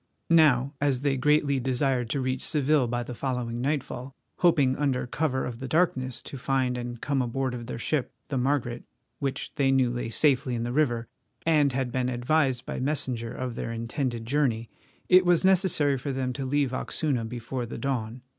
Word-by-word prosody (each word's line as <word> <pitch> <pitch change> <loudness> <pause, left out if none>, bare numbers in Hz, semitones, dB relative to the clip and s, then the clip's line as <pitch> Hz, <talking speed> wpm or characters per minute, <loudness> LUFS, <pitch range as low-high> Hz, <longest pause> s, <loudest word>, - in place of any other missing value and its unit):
Now, 145 -5 +5
as 140 -3 +1
they 140 -1 +1
greatly 140 0 +2
desired 130 -1 0
to 140 - -1
reach 130 0 -1
Seville 145 -3 +2
by 120 +1 -2
the 125 - -7
following 120 -2 -3
nightfall, 135 -1 -3 0.2
hoping 145 -7 +4
under 135 -4 0
cover 130 0 -1
of 120 -2 -6
the 135 - -5
darkness 130 -6 0
to 135 - -8
find 130 -1 0
and 120 -1 -5
come 140 0 0
aboard 130 +1 -1
of 120 -1 -6
their 125 - -4
ship, 135 +3 -1 0.2
the 135 - -1
Margaret, 125 -2 0 0.4
which 135 -2 -3
they 135 -2 +3
knew 130 -2 +3
lay 120 -1 -3
safely 130 -1 +2
in 115 - -2
the 120 +1 -3
river, 120 -6 +1 0.4
and 150 -4 +4
had 130 -1 -1
been 125 0 0
advised 130 0 +1
by - - -4
messenger 130 -4 -1
of 130 -1 -4
their 115 - -4
intended 115 +1 -3
journey, 120 -4 0 0.4
it 185 0 +7
was 175 0 +3
necessary 175 -8 +3
for 140 +2 -3
them 130 -1 -2
to 135 +1 -4
leave 140 -1 +1
Oxuna 135 -2 -1
before 120 +1 -4
the - - -6
dawn. 125 -3 -3
130 Hz, 185 wpm, -27 LUFS, 120-145 Hz, 0.4 s, it